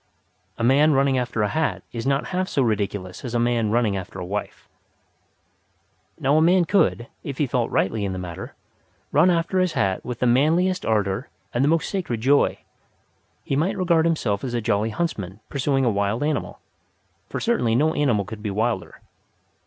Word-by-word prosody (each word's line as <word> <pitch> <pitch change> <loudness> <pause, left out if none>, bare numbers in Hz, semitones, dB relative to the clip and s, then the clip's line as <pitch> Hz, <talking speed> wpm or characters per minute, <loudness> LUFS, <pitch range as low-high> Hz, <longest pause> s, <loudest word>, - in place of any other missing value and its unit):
A 115 - -3
man 145 +5 +5
running 135 -1 +3
after 120 -3 -1
a - - +2
hat 155 +9 -1
is 115 +2 -4
not 140 +1 0
half 185 +1 -1
so 135 - +1
ridiculous 100 -4 -2
as 120 -2 -4
a - - +2
man 120 -2 +1
running 110 -2 +1
after 95 0 -6
a 90 - -5
wife. 100 +3 -5 1.5
Now 145 0 +3
a - - +4
man 175 +2 +4
could, 165 - +2 0.2
if 140 -2 -5
he 150 - +2
felt 125 -2 -1
rightly 105 +2 0
in 100 - -1
the 95 - -4
matter, 90 -2 -7 0.6
run 155 +6 +5
after 175 +2 +1
his 185 -2 +1
hat 95 -1 0
with 125 -2 -5
the 125 - 0
manliest 165 +9 +2
ardour 105 +1 0 0.2
and 120 - +1
the - - +3
most 165 +2 +2
sacred 175 - -3
joy. 140 +5 +3 0.9
He 135 - -2
might 165 +9 0
regard 170 -3 +2
himself 120 -12 0
as 125 -2 -3
a - - +1
jolly 105 0 0
huntsman 105 - -3
pursuing 135 -1 0
a 120 - +3
wild 100 +4 0
animal, 155 +1 -2 0.7
for - - -3
certainly 220 - +1
no 155 +5 +3
animal 120 -9 +1
could 105 +1 -8
be 105 - -3
wilder. 105 -1 -2
125 Hz, 185 wpm, -23 LUFS, 105-155 Hz, 1.5 s, man